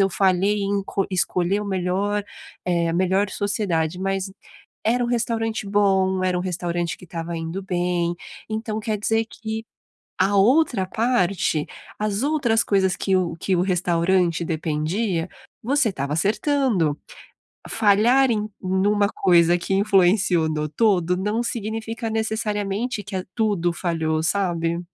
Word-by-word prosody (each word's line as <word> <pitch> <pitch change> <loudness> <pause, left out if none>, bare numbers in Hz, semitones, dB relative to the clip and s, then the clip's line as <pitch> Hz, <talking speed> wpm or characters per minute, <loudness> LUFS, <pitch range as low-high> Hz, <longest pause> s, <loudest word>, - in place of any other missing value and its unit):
eu 195 - +4
falhei 195 +2 +2
em 200 0 0
co 195 - -1
escolher 185 +2 0
o 210 - -5
melhor, 195 +2 -1 0.4
eh, 170 -2 +1
a 165 - -1
melhor 190 +3 +2
sociedade", 185 -5 -1
mas 195 0 -2 0.5
era 245 +3 +2
um - - -2
restaurante 225 -2 -1
bom, 190 -2 +2
era 180 -1 +1
um - - -2
restaurante 175 -1 -2
que 180 - -14
tava 165 0 -5
indo 165 +4 -4
bem. 175 -2 -1 0.3
Então, 220 0 -3
quer 215 0 -2
dizer 225 +2 +1
que 220 0 -6 0.5
a 195 +2 +2
outra 240 -2 +3
parte, 200 -8 0 0.3
as 210 +1 -1
outras 275 -7 +2
coisas 190 -2 +2
que 190 -1 +1
o 175 -3 0
que 185 +2 0
o 175 - +1
restaurante 175 -1 +1
dependia, 165 +3 -1 0.3
você 265 0 +2
tava 140 -3 -3
acertando. 205 - +1 0.7
Falhar 225 +5 +4
em 215 -1 -1
numa 200 +2 +2
coisa 175 -3 +4
que 175 +2 -3
influenciou 190 -4 +3
no 150 -1 -2
todo 180 0 +2
não 210 +5 -1
significa, 225 0 -4
necessariamente, 220 0 -2
que 190 - -7
a 185 - -3
tudo 200 -7 +1
falhou, 160 -3 -1
sabe? 170 -2 0
195 Hz, 140 wpm, -23 LUFS, 175-215 Hz, 0.7 s, eu